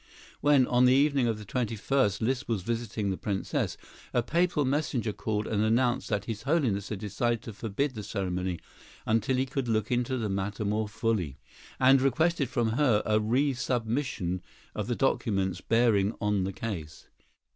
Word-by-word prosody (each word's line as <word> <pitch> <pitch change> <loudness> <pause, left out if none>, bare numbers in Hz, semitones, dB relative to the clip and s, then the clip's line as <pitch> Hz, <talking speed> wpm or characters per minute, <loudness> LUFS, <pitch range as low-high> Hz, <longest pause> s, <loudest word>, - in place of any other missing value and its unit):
When, 145 -3 +5
on 125 +1 +3
the 125 +1 +6
evening 140 -3 +3
of 115 -2 0
the 105 - -9
21st, 115 -1 0
Liszt 130 +4 0
was 110 -6 -1
visiting 115 -2 -2
the 95 - -2
Princess, 100 -2 -2 0.4
a 120 - +3
Papal 170 0 +1
messenger 130 -5 0
called 105 0 -2
and 105 -1 0
announced 120 +3 +1
that 105 -2 -1
His 110 -2 -4
Holiness 125 - 0
had 105 - -3
decided 115 +3 -1
to 115 - -7
forbid 115 +7 -2
the 110 - -6
ceremony 90 -3 -3 0.5
until 115 +4 +1
he 130 - +1
could 135 -1 -3
look 110 0 0
into 125 +1 0
the 110 -3 -1
matter 100 +2 -2
more 105 +1 0
fully, 105 - -1 0.4
and 130 +1 +6
requested 140 +1 +2
from 115 -2 0
her 120 -3 +2
a 110 0 +3
resubmission 120 -5 0 0.3
of - - -3
the - - 0
documents 95 -4 0
bearing 115 -3 +2
on 105 -3 +1
the 95 - -3
case. 85 -9 -6
115 Hz, 165 wpm, -28 LUFS, 105-130 Hz, 0.5 s, the